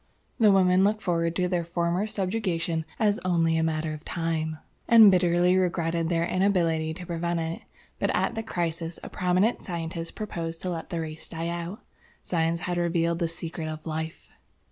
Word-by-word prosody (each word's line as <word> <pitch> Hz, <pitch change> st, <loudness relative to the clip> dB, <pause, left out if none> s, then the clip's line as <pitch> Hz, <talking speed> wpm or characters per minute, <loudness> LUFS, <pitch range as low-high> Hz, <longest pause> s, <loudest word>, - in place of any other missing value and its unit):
The 215 Hz, -3 st, +6 dB
women 185 Hz, -1 st, +5 dB
looked 210 Hz, +2 st, +1 dB
forward 170 Hz, -2 st, 0 dB
to 180 Hz, 0 st, +1 dB
their 175 Hz, -1 st, 0 dB
former 170 Hz, +3 st, -1 dB
subjugation 185 Hz, -6 st, -1 dB
as 210 Hz, -2 st, +2 dB
only 165 Hz, -3 st, +2 dB
a 160 Hz, -, +2 dB
matter 160 Hz, -1 st, -1 dB
of 155 Hz, 0 st, -8 dB
time, 160 Hz, -2 st, -2 dB, 0.3 s
and 225 Hz, -3 st, +9 dB
bitterly 180 Hz, 0 st, +3 dB
regretted 170 Hz, -2 st, +1 dB
their 170 Hz, -1 st, +1 dB
inability 170 Hz, -4 st, +1 dB
to 180 Hz, -, -8 dB
prevent 170 Hz, 0 st, -1 dB
it. 165 Hz, 0 st, -3 dB, 0.4 s
But -, -, +1 dB
at -, -, +1 dB
the 225 Hz, -, -2 dB
crisis, 170 Hz, -5 st, -3 dB
a -, -, -6 dB
prominent 185 Hz, +6 st, +1 dB
scientist 165 Hz, -1 st, -5 dB
proposed 165 Hz, -6 st, -4 dB
to 185 Hz, -, -1 dB
let 165 Hz, -1 st, -5 dB
the 170 Hz, -2 st, -2 dB
race 155 Hz, 0 st, -6 dB
die 165 Hz, 0 st, -3 dB
out. 175 Hz, +4 st, -5 dB, 0.4 s
Science 165 Hz, -1 st, 0 dB
had 175 Hz, +1 st, -2 dB
revealed 170 Hz, -1 st, +1 dB
the 170 Hz, -, +1 dB
Secret 165 Hz, -1 st, -5 dB
of 155 Hz, 0 st, -6 dB
Life." 160 Hz, 0 st, -5 dB
170 Hz, 175 wpm, -27 LUFS, 165-185 Hz, 0.4 s, and